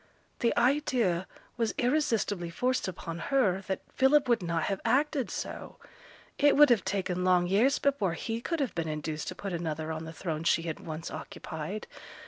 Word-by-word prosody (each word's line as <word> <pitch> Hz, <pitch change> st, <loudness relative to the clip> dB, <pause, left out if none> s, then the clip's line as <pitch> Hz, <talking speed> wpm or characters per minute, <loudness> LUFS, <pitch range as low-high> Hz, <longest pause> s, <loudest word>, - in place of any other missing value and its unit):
The 235 Hz, -, +1 dB
idea 245 Hz, -, +2 dB, 0.3 s
was 230 Hz, -2 st, 0 dB
irresistibly 230 Hz, -, +1 dB
forced 250 Hz, +9 st, 0 dB
upon 170 Hz, -2 st, -5 dB
her 210 Hz, -10 st, +2 dB
that 190 Hz, -, -2 dB
Philip 270 Hz, +1 st, +4 dB
would 235 Hz, -4 st, +3 dB
not 170 Hz, -2 st, -1 dB
have 195 Hz, -1 st, -2 dB
acted 285 Hz, 0 st, +1 dB
so; -, -, -6 dB, 0.6 s
it 290 Hz, 0 st, +5 dB
would 295 Hz, -3 st, +8 dB
have 225 Hz, -5 st, +4 dB
taken 190 Hz, -2 st, -1 dB
long 180 Hz, -1 st, +4 dB
years 220 Hz, +10 st, +3 dB
before 250 Hz, -11 st, +1 dB
he 225 Hz, +7 st, -3 dB
could 330 Hz, +4 st, -2 dB
have 270 Hz, -, -1 dB
been 165 Hz, -1 st, -2 dB
induced 155 Hz, 0 st, -4 dB
to -, -, -4 dB
put 195 Hz, -2 st, -5 dB
another 160 Hz, -2 st, -3 dB
on 160 Hz, 0 st, -4 dB
the 160 Hz, -, -7 dB
throne 160 Hz, -2 st, -4 dB
she 165 Hz, 0 st, +3 dB
had 165 Hz, -2 st, -4 dB
once 160 Hz, +1 st, -6 dB
occupied. 170 Hz, +6 st, -6 dB
190 Hz, 175 wpm, -29 LUFS, 170-255 Hz, 0.6 s, would